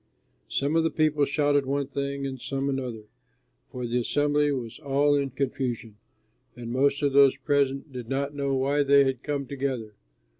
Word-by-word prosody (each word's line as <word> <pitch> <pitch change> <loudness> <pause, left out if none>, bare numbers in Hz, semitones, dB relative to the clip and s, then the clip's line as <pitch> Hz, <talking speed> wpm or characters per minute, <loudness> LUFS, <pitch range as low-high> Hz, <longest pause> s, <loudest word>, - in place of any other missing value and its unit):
Some 140 +3 0
of 165 - +4
the 165 - +2
people 150 -2 +2
shouted 145 -1 +1
one 140 +1 0
thing 140 0 -3
and 130 -2 -5
some 135 +2 -2
another, 125 -5 -3 0.7
for 125 -1 -5
the 120 +1 0
assembly 145 +3 +1
was 125 -2 -4
all 145 0 +2
in 140 -1 +1
confusion, 125 -4 -3 0.6
and 120 -1 -7
most 140 +3 +1
of 140 -1 +2
those 140 -1 +6
present 140 0 0
did 125 -2 -7
not 140 +1 -1
know 140 -1 -1
why 140 +2 +1
they 140 0 +5
had 135 -2 -1
come 145 -2 -3
together. 130 -5 -4
140 Hz, 175 wpm, -26 LUFS, 130-145 Hz, 0.7 s, those